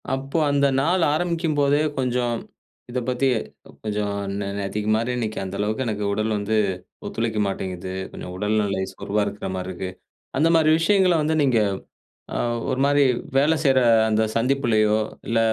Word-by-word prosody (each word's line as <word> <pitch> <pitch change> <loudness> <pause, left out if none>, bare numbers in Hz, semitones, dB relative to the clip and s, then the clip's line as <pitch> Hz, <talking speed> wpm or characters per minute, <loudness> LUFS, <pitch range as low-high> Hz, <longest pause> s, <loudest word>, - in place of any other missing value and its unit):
அப்போ 135 +4 -4
அந்த 140 0 +3 0.2
நாள் 175 +3 +2
ஆரம்பிக்கும்போதே 155 -4 +1 0.2
கொஞ்சம் 125 -2 0 0.5
இத 125 +1 -2
பத்தி 125 +2 +1 0.6
கொஞ்சம் 105 -1 -2 0.3
நே 100 - -3
நேத்திக்கு 105 +2 -2
மாரி 115 +3 0
இன்னைக்கி, 110 -2 -3
அந்த 95 +1 -5
அளவுக்கு 110 +5 -1
எனக்கு 105 -3 -2
உடல் 110 +1 0
வந்து 105 +2 -1 0.5
ஒத்துழைக்க 115 -2 -2
மாட்டேங்குது. 95 -1 -4 0.2
கொஞ்சம் 90 - -8
உடல் 105 +2 0
நெலை 95 -2 -1
சோர்வா 105 +1 -1
இருக்குற 100 -2 -5
மாதிரி 90 0 -4
இருக்கு. 95 +1 -5 0.5
அந்த 165 +2 +4
மாரி 155 -1 +4
விஷயங்கள 190 +1 +4
வந்து 155 +1 +1
நீங்க 125 -5 +3 0.8
அ - - -1 0.3
ஒரு 130 0 -1
மாரி 145 0 +4 0.3
வேலை 150 +4 +4
செய்ற 135 -3 +4 0.3
அந்த 110 0 +2
சந்திப்புலயோ 115 -4 +2 0.3
இல்ல 115 - +1
115 Hz, 150 wpm, -23 LUFS, 105-140 Hz, 0.8 s, அந்த